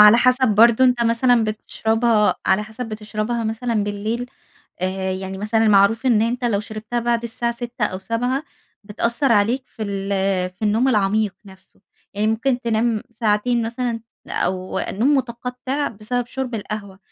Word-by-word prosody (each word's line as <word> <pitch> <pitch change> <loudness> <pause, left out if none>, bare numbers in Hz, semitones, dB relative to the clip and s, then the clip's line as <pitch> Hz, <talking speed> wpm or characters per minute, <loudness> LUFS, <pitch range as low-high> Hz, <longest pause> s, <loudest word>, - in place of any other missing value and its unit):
على 210 +2 +9
حسب 255 +1 +4
برضه 230 +4 +5
أنت 250 -2 +3
مثلًا 235 0 +3
بتشربها 220 0 +1
على 190 +2 +3
حسب 220 +3 -7
بتشربها 215 +2 -3
مثلًا 225 -1 -1
بالليل؟ 215 +4 -3 0.5
آآ، 190 0 -1
يعني 190 0 -5
مثلًا 220 +2 +2
معروف 210 +5 +4
إن 225 -4 +4
أنت 245 +2 -1
لو 215 -4 +1
شربتها 215 +2 -4
بعد 235 0 0
الساعة 235 0 -2
18:00 235 -1 -3
أو 185 -3 -2
19:00 245 +7 -1 0.4
بتأثر 235 +5 0
عليك 230 +5 +2
في 220 - -9
ال 200 -1 -3 0.4
في 185 +4 -20
النوم 220 +5 +2
العميق 210 -3 +1
نفسه. 190 -1 -18 0.3
يعني 210 +1 0
ممكن 245 +3 +1
تنام 230 -1 0
ساعتين 230 +1 +1
مثلًا، 235 0 -2 0.3
أو 185 0 -2
النوم 250 +9 +1
متقطع 250 +3 -2
بسبب 230 +3 -3
شرب 255 0 -4
القهوة، 205 -2 -6
225 Hz, 150 wpm, -21 LUFS, 210-240 Hz, 0.5 s, على